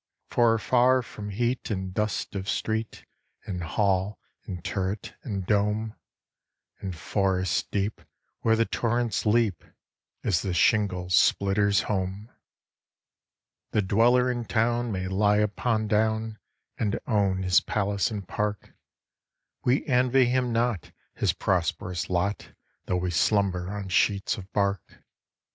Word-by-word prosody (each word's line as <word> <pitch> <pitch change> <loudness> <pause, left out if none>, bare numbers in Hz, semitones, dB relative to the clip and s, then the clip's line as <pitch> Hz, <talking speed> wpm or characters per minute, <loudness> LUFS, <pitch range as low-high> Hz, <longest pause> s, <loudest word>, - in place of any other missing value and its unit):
For 120 -2 +4
afar 125 +3 +3
from 105 -2 -8
heat 120 +5 -1
and 95 -3 -3
dust 105 -1 -2
of 95 0 -4
street, 110 0 -2 0.4
And 90 -3 -4
hall 95 +2 0 0.3
and 90 -3 -6
turret 95 +1 -3
and 100 -6 -4
dome, 105 +2 0 0.9
In 95 - -4
forest 95 +1 0
deep, 100 +1 -2 0.4
where 110 0 +3
the 115 0 +2
torrents 120 -1 -1
leap, 105 -5 +2 0.6
Is 95 -7 +1
the 95 -3 -2
shingle 90 -3 +2
splitter's 100 +3 +3
home. 100 +2 -3 1.4
The 105 - +2
dweller 120 +6 +3
in 120 -1 -3
town 120 +1 0
may 95 -2 -2
lie 105 +2 +2
upon 110 +1 0
down, 110 +1 0 0.4
And 105 0 0
own 100 -4 +1
his 90 -1 +5
palace 100 -1 -1
and 100 -4 -6
park: 105 -1 -3 0.9
We 125 +4 +2
envy 130 -1 +3
him 125 0 +1
not 115 -6 -1 0.2
his - - +1
prosperous 90 0 -1
lot, 90 +3 -1 0.3
Though 90 - +1
we 90 0 -1
slumber 95 0 +1
on 100 -1 -5
sheets 100 +3 +2
of 100 -2 -10
bark. 100 -2 -2
105 Hz, 125 wpm, -26 LUFS, 95-115 Hz, 1.4 s, his